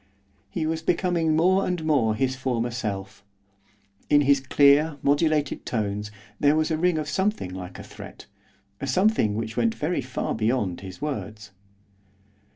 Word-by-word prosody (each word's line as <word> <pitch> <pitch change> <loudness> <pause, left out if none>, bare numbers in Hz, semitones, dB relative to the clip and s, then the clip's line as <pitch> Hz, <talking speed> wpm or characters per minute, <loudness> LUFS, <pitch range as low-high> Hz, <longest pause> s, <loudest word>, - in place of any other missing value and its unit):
He 165 -3 -2
was 160 0 -1
becoming 165 -2 +1
more 185 +4 +3
and 175 -3 -2
more 125 -9 +2
his 130 +3 0
former 125 -2 -1
self. 105 -4 -5 0.9
In 145 - +5
his 140 0 +4
clear, 140 +3 +4
modulated 145 0 +1
tones 105 -2 -2 0.3
there 145 +1 +4
was 155 +1 +1
a 160 - +1
ring 180 -1 +2
of 155 -1 -3
something 190 - -1
like 90 -1 -8
a - - -9
threat, - - -11 0.5
a 135 - -4
something 180 - +2
which 110 0 -4
went 230 -1 +1
very 155 -3 -1
far 125 0 -3
beyond 110 -5 -1
his 95 +6 -9
words. 105 -7 -5
140 Hz, 155 wpm, -25 LUFS, 110-160 Hz, 0.9 s, In